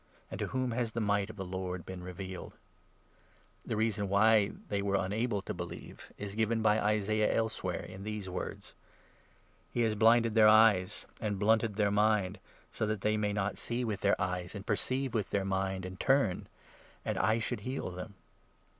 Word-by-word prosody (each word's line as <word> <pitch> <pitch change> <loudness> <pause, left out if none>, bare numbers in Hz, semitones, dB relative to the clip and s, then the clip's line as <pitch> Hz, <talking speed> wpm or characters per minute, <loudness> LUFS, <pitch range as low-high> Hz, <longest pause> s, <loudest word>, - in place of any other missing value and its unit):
And - - -5
to - - -1
whom 130 -1 -1
has 115 -1 -1
the 115 - -1
might 100 -1 +1
of - - -8
the 95 -2 -5
Lord 90 -1 -4
been 95 -1 -7
revealed? 90 +1 -7 0.6
' - - -34
The - - -1
reason 105 -2 0
why 105 +1 +4 0.2
they 100 -1 -1
were 100 0 0
unable 100 +2 0
to - - -4
believe - - -8
is 100 -1 -6
given 110 +1 0
by 110 0 +4
Isaiah 105 +1 +2
39 - - +1
elsewhere, 110 -6 -2
in 95 +1 -9
these 105 -2 -4
words 90 0 -6 0.3
— - - -32
' - - -35
He 120 - +2
has 110 -2 +2
blinded 115 +1 +4
their 110 -1 +7
eyes, 105 -3 +5
and 105 -2 -2
blunted 110 +1 +2
their 105 -1 +2
mind, 105 -2 +2 0.3
40 - - -21
So - - 0
that 110 -2 -2
they 105 +2 +2
should 105 -1 0
not 100 -1 -1
see 120 +1 -2
with 105 -3 -3
their 100 - +2
eyes, 90 0 -2
and 100 0 -7
perceive 130 +5 -1
with 110 -4 -1
their 100 -1 0
mind, 95 -1 -1
and 95 0 -8
turn 135 -9 +2 0.3
— - - -27
And - - -1
I 110 +3 +3
should 115 - -2
heal 125 -2 -4
them.' 90 +3 -8
105 Hz, 200 wpm, -32 LUFS, 95-110 Hz, 0.6 s, their